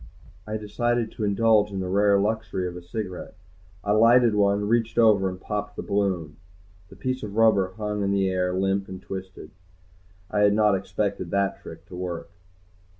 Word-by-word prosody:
I 110 0 -2
decided 115 +2 -1
to - - -6
indulge 105 0 +3
in 100 -1 -5
the 95 - -3
rare 100 +1 +3
luxury 105 -3 -1
of 90 - -7
a 90 - -8
cigarette. 90 +1 -6 0.5
I 105 - -1
lighted 115 +2 +5
one, 100 0 +2
reached 115 0 0
over, 105 -5 +4
and 90 0 -8
popped 105 +1 -4
the - - -5
balloon. 95 -7 -1 0.5
The - - -14
piece 130 0 -3
of 105 -2 -7
rubber 105 -5 +3
hung 105 -1 -3
in 100 - 0
the 100 -1 +1
air, 90 -1 0
limp 95 +1 0
and 95 -1 -7
twisted. 95 -4 -8 0.8
I 105 - 0
had 105 0 +5
not 105 -1 +4
expected 95 -1 -2
that 100 +1 -1
trick - - -11
to - - -11
work. 90 -2 -5
100 Hz, 180 wpm, -25 LUFS, 95-110 Hz, 0.8 s, lighted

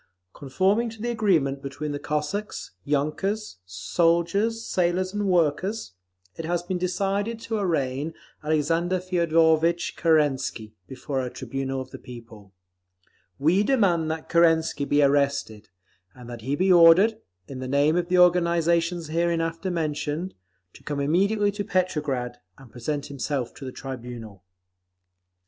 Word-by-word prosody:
Conforming 190 - 0
to 225 0 -12
the 240 +2 -2
agreement 165 -12 +1
between 140 +2 -5
the 145 - -4
Cossacks, 150 - -3
yunkers, 155 - -2
soldiers, 170 - 0
sailors 185 +1 0
and 205 -1 -1
workers, 180 - 0 0.4
it 165 - -6
has 175 +1 -1
been 180 0 -3
decided 195 +5 -1
to 225 -1 -3
arraign 150 -4 -1 0.3
Alexander 165 +4 +1
Feodorvitch 170 -2 +2
Kerensky 140 -9 +1
before 130 +1 -4
a 125 - -3
tribunal 135 +2 -4
of 130 0 -10
the - - -9
people. 115 -5 -12 0.9
We 165 +8 +3
demand 195 -10 +2
that 160 0 -4
Kerensky 165 -3 +3
be 145 +1 +3
arrested, 140 -6 0 0.5
and 125 -1 -12
that 120 -1 -8
he 135 +5 -1
be 185 +3 +3
ordered, 175 +6 +6 0.3
in 135 -2 -7
the 130 - -5
name 145 +4 +2
of 175 -1 0
the 180 0 +2
organisations 170 -1 +3
hereinafter 165 +1 -1
mentioned, 160 +1 -2 0.4
to - - -15
come 145 -1 -3
immediately 200 +8 +2
to 205 +1 -4
Petrograd 150 -11 -1 0.2
and 135 -4 -16
present 140 +4 -3
himself 140 -2 -3
to 140 - -10
the 130 - -5
tribunal. 120 -7 -8
165 Hz, 135 wpm, -25 LUFS, 140-180 Hz, 0.9 s, ordered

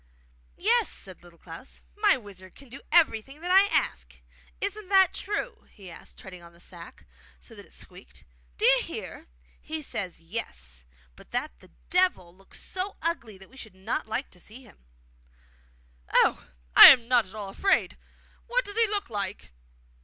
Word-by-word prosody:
'Yes,' 455 +3 +2
said 185 -2 -9
Little 175 -1 -18
Klaus; 165 +8 -11 0.2
'my 415 -1 +3
wizard 190 -5 -13
can 275 -2 -16
do 270 +4 -11
everything 275 -4 +2
that 355 +1 -2
I 390 +2 +6
ask. - - -2 0.4
Isn't 405 0 -3
that 380 -2 +5
true?' 445 +4 -5
he 195 -4 -13
asked, - - -14
treading 180 -2 -11
on 170 0 -15
the 170 - -21
sack 175 -1 -11 0.3
so 60 - -14
that - - -12
it - - -25
squeaked. - - -12 0.3
'Do - - 0
you - - +5
hear? - - -8 0.3
He 315 0 -5
says 195 -9 -5
''Yes;'' 65 - -6 0.3
but - - -17
that - - -4
the - - -19 0.2
Devil 355 - +1
looks 195 +1 -16
so 380 +2 -5
ugly 270 - -3
that 190 0 -16
we 265 - -17
should 220 -6 -11
not 195 +4 -4
like 250 +5 -4
to 180 - -15
see 225 +8 -13
him.' 215 - -20 1.3
'Oh! - - +2 0.3
I'm 235 -3 +10
not 240 -4 +3
at 190 - -13
all 205 -2 -6
afraid. 385 - +1 0.5
What - - 0
does 410 +1 -7
he 460 -1 +5
look 405 - -2
like? 200 - -4
230 Hz, 170 wpm, -27 LUFS, -, 1.3 s, I'm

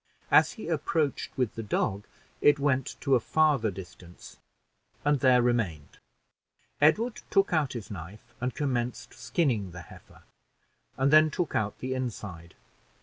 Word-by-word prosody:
As - - +5
he 220 - -8
approached 155 -3 -1
with 125 -4 0
the 115 - -5
dog, 100 -1 -1 0.4
it 145 0 +5
went 135 -2 0
to 140 - +1
a 125 - +6
farther 145 -3 +2
distance, 90 -2 -11 0.7
and 145 -1 +3
there 125 -2 +4
remained. 105 -12 -1 0.8
Edward 215 +11 +3
took 195 -2 +2
out 150 -5 +1
his 115 -4 -7
knife 105 +6 -10
and 125 0 -2
commenced 125 -4 -2
skinning 120 - -1
the 90 - -8
heifer, - - -16 0.7
and 135 +3 +2
then 155 0 +7
took 170 0 -3
out 105 -1 -1
the 130 +1 -3
inside. 100 -10 -6
125 Hz, 145 wpm, -28 LUFS, 105-145 Hz, 0.8 s, then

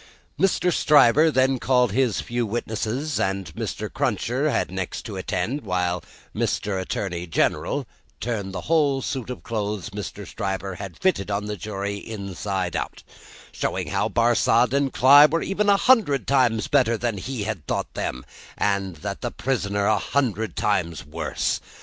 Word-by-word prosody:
Mr. 180 -2 +2
Stryver 150 +1 +5
then 130 -2 +2
called 125 -3 +3
his 125 -1 +1
few 120 0 -2
witnesses, 120 +5 -2
and 95 -4 -2
Mr. - - -4
Cruncher - - 0
had - - 0
next - - -4
to - - -7
attend 140 +6 -2
while 90 -3 -1 0.3
Mr. 100 -2 -1
Attorney 90 -2 -3
General 80 - 0 0.3
turned 105 -5 -3
the 90 -1 -5
whole 145 -5 +2
suit 130 -4 -3
of 125 - -6
clothes 105 -4 -3
Mr. 105 0 -6
Stryver 95 +1 -3
had 100 -3 -7
fitted 180 - +1
on 100 +1 -1
the 105 0 -3
jury, 100 +1 -4
inside 100 -3 -4
out; - - -4 0.5
showing - - -2
how - - 0
Barsad 120 +1 +3
and 140 -1 +2
Cly 140 +3 +8
were 165 +2 -1
even 205 +1 0
a 200 - +6
hundred 210 - +3
times 125 -5 +2
better 125 -5 +3
than 115 -3 -2
he 125 +1 -4
had 100 -7 -4
thought - - -2
them, 65 0 -4 0.3
and 100 -3 0
the 75 - -4
prisoner 100 -6 -1
a 110 0 +3
hundred 110 - -1
times 80 -3 -1
worse. 75 +1 -2
110 Hz, 155 wpm, -24 LUFS, 95-130 Hz, 0.5 s, Cly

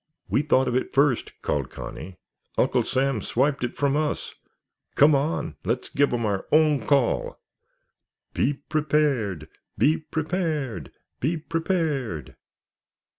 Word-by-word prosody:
"We - - +2
thought 135 -3 +2
of 125 - 0
it 130 - -1
first," 140 -3 +3
called 70 -3 -1
Connie. 90 +2 -8 0.4
"Uncle - - +3
Sam 135 -3 0
swiped 135 +6 0
it 120 - -2
from 140 -1 +1
us. 150 0 -1 0.6
Come 150 +2 +6
on, 145 +4 -1
let's 115 +6 -2
give 145 0 +2
'em 120 -2 0
our 100 -2 -1
own 150 -6 +3
call!" 140 -4 +1 0.9
"_Be 140 +1 0
prepared! 140 - 0 0.3
Be 155 +3 +4
prepared! 155 - -2 0.3
Be 160 +6 0
prepared! 155 - -2
140 Hz, 125 wpm, -25 LUFS, 120-155 Hz, 0.9 s, Come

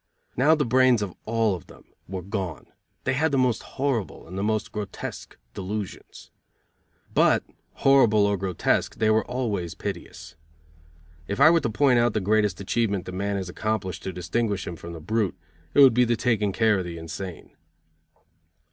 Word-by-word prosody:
Now 145 +6 +5
the 150 -2 0
brains 125 -2 +4
of 95 -3 -5
all 115 -2 +2
of 90 - -7
them - - -16 0.2
were 95 -1 -5
gone, 95 - -4 0.4
they 130 - 0
had 155 +4 +1
the 140 - +1
most 125 -4 +2
horrible 130 -12 -3
and 90 - -9
the 95 - -2
most 105 0 -1
grotesque 105 -3 -6 0.2
delusions. 100 +1 -6 0.8
But - - +4 0.3
horrible 120 -7 +4
or 100 0 +2
grotesque 95 -2 0
they 110 -1 +2
were 110 0 +3
always 105 -9 -3
piteous. 90 -5 -7 0.9
If 100 - -3
I 155 +4 +8
were 170 - +4
to 120 - -2
point 125 +2 +3
out 120 -1 +2
the - - +3
greatest 105 -3 +1
achievement 100 -1 -1
that - - -6
man 100 +2 -2
has 95 -2 -3
accomplished 100 -1 -3
to 95 - -4
distinguish 95 +3 -2
him 85 - -5
from 85 +1 -9
the 85 - -7
brute, 105 +1 -1 0.4
it 145 - +7
would 135 -3 +8
be 125 +2 +4
the 120 0 +1
taking 110 -4 +1
care 105 +1 +2
of 90 - -3
the 85 -1 -6
insane. 85 +2 -8
105 Hz, 175 wpm, -25 LUFS, 95-120 Hz, 0.9 s, I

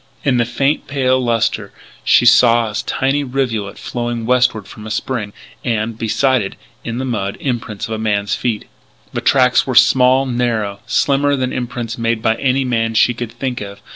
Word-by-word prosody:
In 135 -4 +2
the 120 - +2
faint, 135 +5 -1
pale 130 -2 +1
lustre 115 -2 0 0.3
she - - +4
saw 115 -1 +5
a - - -8
tiny 135 +2 0
rivulet 125 -7 -2
flowing 120 -1 -4
westward 125 -4 +2
from 105 +1 -10
a - - -6
spring, 110 -2 -3 0.3
and, 115 -2 -1
beside 120 +3 +1
it, 95 - -5 0.3
in 115 0 -4
the 130 - -2
mud, 100 -6 -3
imprints 115 -6 -3
of 110 - -4
a 110 - -3
man's 100 -2 0
feet. 115 -4 -2 0.5
The - - -2
tracks 125 -1 +3
were 130 - -2
small, 130 +2 +5
narrow, 115 -5 -1
slimmer 140 0 +2
than 130 -1 -2
imprints 120 -2 -4
made 115 -1 -1
by 110 - +3
any 135 +1 +1
man 115 -2 0
she 120 - +4
could 120 -1 -6
think 125 0 -4
of. 100 0 -8
120 Hz, 180 wpm, -17 LUFS, 110-130 Hz, 0.5 s, saw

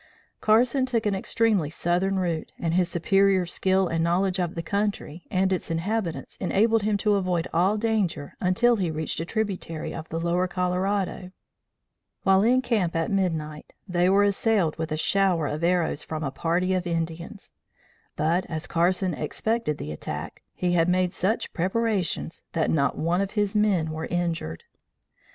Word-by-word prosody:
Carson 240 +5 +3
took 235 -3 0
an 205 - +2
extremely 195 -4 +1
southern 180 +4 0
route, 170 -4 -2
and 165 -1 -1
his 180 0 +2
superior 195 +2 +3
skill 190 +2 +1
and 165 -1 0
knowledge 185 +3 +1
of 175 -2 -1
the 165 - -3
country 200 -4 -3
and 190 0 +1
its 185 - -3
inhabitants 175 +2 -2
enabled 220 +4 +2
him 210 0 +1
to 210 +1 +2
avoid 185 -4 0
all 185 +6 +3
danger 210 -10 -1
until 230 +6 +3
he 185 -4 0
reached 160 0 -3
a 165 - -2
tributary 190 -6 -3
of 160 -1 -7
the 165 - -3
lower 175 +2 +1
Colorado. 185 +1 -1 0.9
While 190 0 +5
in 250 +4 +3
camp 210 -9 0
at 165 +2 0
midnight, 160 -6 -2
they 180 -1 +2
were 200 +1 +5
assailed 200 -4 +2
with 160 -1 -3
a 155 - -1
shower 185 -1 +2
of 150 +3 -3
arrows 170 -3 +1
from 155 0 -5
a 135 - -2
party 175 +5 0
of 180 -1 -1
Indians; 170 +3 -4 0.6
but, 165 +4 +1
as 160 0 -4
Carson 180 +2 +1
expected 155 +2 -2
the 75 - -6
attack, 75 - -6
he 180 -1 0
had 170 0 +3
made 180 0 +1
such 200 +5 -1
preparations 190 -2 -1
that 160 -2 +1
not 140 -3 +1
one 170 +4 +1
of 195 -1 -3
his 205 0 +1
men 195 -7 +2
were 160 +1 -4
injured. 165 - -2
180 Hz, 165 wpm, -25 LUFS, 165-200 Hz, 0.9 s, While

